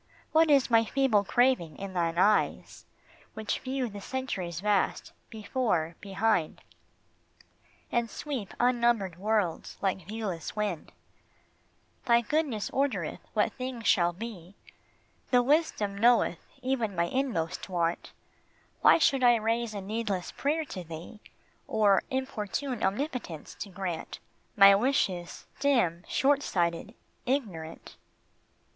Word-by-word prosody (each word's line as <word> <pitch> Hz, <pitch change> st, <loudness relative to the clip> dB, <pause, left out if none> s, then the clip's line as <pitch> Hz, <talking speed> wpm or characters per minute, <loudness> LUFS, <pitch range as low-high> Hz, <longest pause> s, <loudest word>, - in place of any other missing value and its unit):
What 320 Hz, 0 st, +4 dB
is 275 Hz, -4 st, +4 dB
my 230 Hz, 0 st, +6 dB
feeble 235 Hz, -3 st, +2 dB
craving 240 Hz, -, +2 dB
in 195 Hz, -1 st, -6 dB
thine 170 Hz, -2 st, -1 dB
eyes 205 Hz, +3 st, +1 dB, 0.5 s
Which 220 Hz, -1 st, -2 dB
view 260 Hz, -1 st, -2 dB
the 205 Hz, -2 st, -8 dB
centuries 195 Hz, -10 st, -4 dB
vast, 205 Hz, 0 st, 0 dB, 0.2 s
before, 210 Hz, -7 st, -1 dB
behind, 195 Hz, -4 st, 0 dB, 1.3 s
And 235 Hz, -1 st, 0 dB
sweep 260 Hz, -5 st, -5 dB
unnumbered 235 Hz, -7 st, +2 dB
worlds 205 Hz, -4 st, -1 dB
like 190 Hz, -3 st, -2 dB
viewless 205 Hz, -7 st, -4 dB
wind? 205 Hz, -7 st, -3 dB, 1.1 s
Thy 235 Hz, -2 st, +5 dB
goodness 260 Hz, -4 st, -1 dB
ordereth 275 Hz, 0 st, -1 dB
what -, -, +1 dB
thing 255 Hz, -2 st, -5 dB
shall 175 Hz, -6 st, +3 dB
be, 190 Hz, -2 st, -9 dB, 0.7 s
The 250 Hz, -1 st, +4 dB
wisdom 265 Hz, -8 st, +1 dB
knoweth 225 Hz, -5 st, +3 dB, 0.2 s
even 240 Hz, -6 st, -1 dB
my 170 Hz, 0 st, +2 dB
inmost 200 Hz, -8 st, -2 dB
want; 170 Hz, -2 st, -1 dB, 0.7 s
Why -, -, +7 dB
should 275 Hz, -5 st, +2 dB
I 240 Hz, -1 st, +7 dB
raise 225 Hz, 0 st, -1 dB
a 200 Hz, -, -4 dB
needless 205 Hz, -2 st, -3 dB
prayer 310 Hz, +3 st, -1 dB
to 185 Hz, -10 st, -7 dB
thee, 165 Hz, +5 st, -9 dB, 0.5 s
Or 210 Hz, -3 st, +3 dB
importune 260 Hz, -1 st, -3 dB
Omnipotence 210 Hz, -, -3 dB
to 205 Hz, -, -5 dB
grant 180 Hz, -3 st, -5 dB, 0.4 s
My 200 Hz, 0 st, +9 dB
wishes, 195 Hz, -6 st, 0 dB
dim, 235 Hz, -12 st, +2 dB
short 285 Hz, 0 st, +2 dB
sighted, 175 Hz, +1 st, -1 dB, 0.3 s
ignorant 195 Hz, -, -3 dB
215 Hz, 115 wpm, -29 LUFS, 185-255 Hz, 1.3 s, My